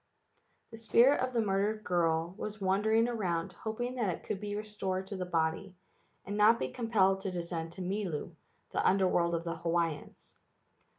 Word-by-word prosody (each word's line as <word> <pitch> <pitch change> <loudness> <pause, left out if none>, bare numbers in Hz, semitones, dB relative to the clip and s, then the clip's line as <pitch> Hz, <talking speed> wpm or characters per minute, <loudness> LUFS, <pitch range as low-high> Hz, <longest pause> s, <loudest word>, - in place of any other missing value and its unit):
The 225 - -9
spirit 235 +4 +4
of 255 0 0
the 235 -2 +1
murdered 205 +2 0
girl 170 -2 +1
was 215 0 -6
wandering 210 +4 +2
around 185 -6 -2
hoping 225 +6 -4
that 220 -5 +1
it 175 - -4
could 195 - -3
be 205 0 -4
restored 200 -3 -3
to 200 - -6
the 185 -1 -4
body, 170 +3 -1 0.5
and 205 - -4
not 215 +2 +6
be - - -2
compelled 200 -5 +2
to 195 - -2
descend 170 -2 -4
to 185 +1 -6
Milu, 180 -4 -3 0.4
the - - 0
Under 190 0 +4
world 170 -1 +2
of 165 - -2
the 170 -1 -4
Hawaiians. 165 -3 -3
195 Hz, 175 wpm, -31 LUFS, 175-215 Hz, 0.5 s, not